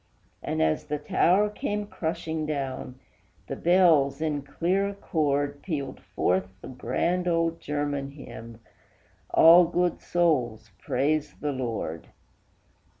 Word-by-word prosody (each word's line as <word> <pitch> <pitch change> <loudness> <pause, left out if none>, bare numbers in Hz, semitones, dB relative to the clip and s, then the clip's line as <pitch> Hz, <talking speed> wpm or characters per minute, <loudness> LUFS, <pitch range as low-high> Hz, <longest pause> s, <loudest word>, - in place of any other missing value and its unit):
And 80 - -1
as 80 0 0
the 150 0 -2
tower 180 +7 +3
came 210 0 -3
crushing 160 -4 -3
down, 135 -4 -4 0.5
the - - -5
bells, 165 -6 +4
in 155 -2 -1
clear 175 +8 0
accord, 145 -7 -1
Pealed 145 -7 -4
forth 95 +1 -1
the - - -10
grand 170 +8 -1
old 165 -1 +1
German 145 -1 -2
hymn, 115 -5 -11 0.7
"All 170 +2 +8
good 175 +1 0
souls, 125 - 0
praise 150 +3 -1
the 150 - -2
Lord!" 115 - -4
150 Hz, 115 wpm, -26 LUFS, 135-170 Hz, 0.7 s, All